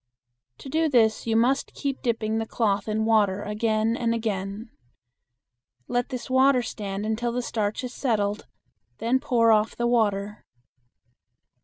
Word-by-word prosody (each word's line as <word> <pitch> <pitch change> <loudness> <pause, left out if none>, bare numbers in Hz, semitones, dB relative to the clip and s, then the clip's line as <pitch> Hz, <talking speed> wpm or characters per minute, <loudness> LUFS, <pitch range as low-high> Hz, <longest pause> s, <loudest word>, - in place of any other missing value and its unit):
To - - -11
do 315 +3 +1
this 225 -4 +2
you 225 - +1
must 250 +4 +1
keep 275 -2 -3
dipping 225 -3 -1
the 225 - -3
cloth 210 -4 0
in 220 0 0
water 205 -3 +2
again 215 +1 0
and 230 -1 0
again. 210 0 -4 1.2
Let 245 0 -1
this 255 -3 -5
water 260 -1 +4
stand 205 -2 -5
until 225 +2 -1
the 245 +1 -2
starch 210 -3 -2
has 250 -1 -6
settled, 210 -6 -1 0.5
then 240 +3 +1
pour 230 -3 +3
off 215 0 +2
the 240 - -1
water. 210 -4 0
225 Hz, 145 wpm, -25 LUFS, 210-245 Hz, 1.2 s, water